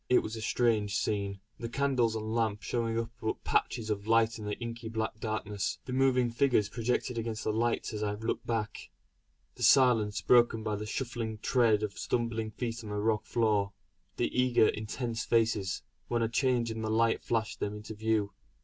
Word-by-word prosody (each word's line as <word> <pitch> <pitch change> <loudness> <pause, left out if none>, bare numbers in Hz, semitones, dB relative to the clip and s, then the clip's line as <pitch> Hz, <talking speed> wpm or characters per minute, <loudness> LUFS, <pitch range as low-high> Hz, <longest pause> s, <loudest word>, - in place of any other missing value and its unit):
It 125 - +5
was 110 - -5
a 110 - -6
strange 110 -3 +1
scene. 100 -2 -2 0.2
The 115 - -4
candles 125 -3 +1
and 110 0 -3
lamp 110 -3 0
showing 115 -2 -1
up 115 0 -2
but 110 - -2
patches 110 -1 0
of 100 0 -3
light 115 0 +3
in 105 - -6
the 105 - -3
inky 115 -1 -6
black 110 -1 -3
darkness; 105 -3 -2
the 125 - -5
moving 130 -2 +3
figures 120 -4 +2
projected 120 0 -1
against 110 -1 -3
the 110 - 0
lights 115 +1 0
as 105 - -4
I 105 -1 -1
looked 110 +2 -3
back; 110 -2 -3 0.6
the - - -14
silence 115 -5 +5
broken 120 -2 +4
by 110 -1 -1
the 105 +1 -5
shuffling 115 -2 -3
tread 110 -2 +3
of 105 -2 -4
stumbling 115 -2 -1
feet 115 +1 -4
on 105 - -7
the 105 - -3
rock 105 +1 0
floor; 105 -4 +1 0.4
the 120 - -1
eager 125 -3 +4
intense 115 +2 -3
faces, 110 -5 +1 0.2
when 120 -1 0
a - - +2
change 120 -1 +1
in 110 0 -4
the 110 - -2
light 115 +1 +2
flashed 110 -2 -1
them 105 0 -2
into 105 +1 -7
view. 110 -1 0
110 Hz, 190 wpm, -30 LUFS, 105-120 Hz, 0.6 s, It